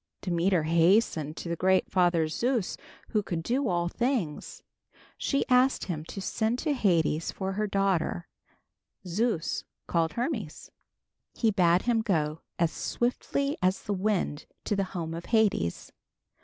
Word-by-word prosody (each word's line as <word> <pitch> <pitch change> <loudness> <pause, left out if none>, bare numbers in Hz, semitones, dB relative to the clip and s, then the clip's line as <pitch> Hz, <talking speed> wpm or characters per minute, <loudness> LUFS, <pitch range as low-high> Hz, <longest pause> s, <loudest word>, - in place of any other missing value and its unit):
Demeter 175 -1 +1
hastened 165 -1 +2
to - - -6
the 170 - -1
great 185 +2 +2
father 175 -3 +3
Zeus, 235 +5 -1 0.3
who 215 - +1
could 170 -4 -4
do 255 +7 0
all 175 -2 +1
things. 230 - -2 0.5
She 275 - 0
asked 255 +1 +4
him 155 -4 -4
to 195 - -7
send 220 +4 -1
to 295 +3 0
Hades 170 - +1
for 190 -1 -3
her 210 +2 -1
daughter. 195 -4 0 0.8
Zeus 185 -1 -1 0.2
called 165 -1 0
Hermes. 235 - -4 0.6
He 225 -2 +2
bade 180 -2 +3
him 235 -2 +2
go 160 -8 0 0.2
as 170 -1 +2
swiftly 275 +3 -1
as 185 +1 +1
the 205 - -2
wind 190 -6 -1 0.2
to 205 - -1
the 195 -1 0
home 165 -1 -3
of 170 +1 -6
Hades. 215 - +1
190 Hz, 140 wpm, -28 LUFS, 170-225 Hz, 0.8 s, asked